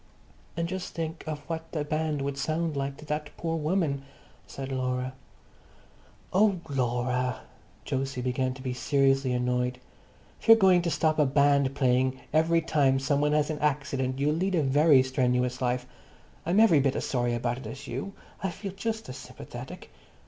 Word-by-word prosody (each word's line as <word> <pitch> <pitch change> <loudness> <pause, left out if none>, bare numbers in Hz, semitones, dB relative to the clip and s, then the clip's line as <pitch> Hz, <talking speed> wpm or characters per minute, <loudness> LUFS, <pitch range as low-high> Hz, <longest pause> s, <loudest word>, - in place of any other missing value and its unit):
"And 170 0 0
just 185 +1 -5
think 165 0 -4
of 150 -1 -4
what 165 -1 -5
the 150 -3 -1
band 155 -1 -1
would 140 0 -2
sound 155 +2 -1
like 140 0 -3
to 155 - -12
that 150 0 -3
poor 165 -1 -2
woman," 155 -3 0 0.5
said 135 0 -6
Laura. 130 0 -2 1.2
"Oh, 195 -1 +4
Laura!" 125 -2 -1 0.5
Jose 135 0 -2
began 130 +1 -1
to 130 - -10
be 130 -2 -2
seriously 135 0 +2
annoyed. 125 0 0 0.6
"If - - -12
you're 225 0 +10
going 190 -4 +5
to 170 - -1
stop 155 -1 +1
a 150 - +5
band 140 0 +3
playing 130 -1 +2
every 165 +2 +3
time 140 -4 +2
some 140 +1 +1
one 150 0 +2
has 150 +1 +2
an 150 - -4
accident, 135 -3 -1
you'll 145 +2 +1
lead 185 +4 0
a 160 - +2
very 140 0 +5
strenuous 125 -1 0
life. 125 0 0 0.6
I'm 180 +5 +3
every 215 -9 +6
bit 135 -1 +1
as - - -2
sorry 120 -2 0
about 120 +1 -2
it - - -8
as 140 +1 -8
you. 135 +11 -5 0.3
I 195 - 0
feel 195 +3 -6
just 220 +3 -4
as 130 - -7
sympathetic." - - -10
140 Hz, 175 wpm, -28 LUFS, 130-160 Hz, 1.2 s, you're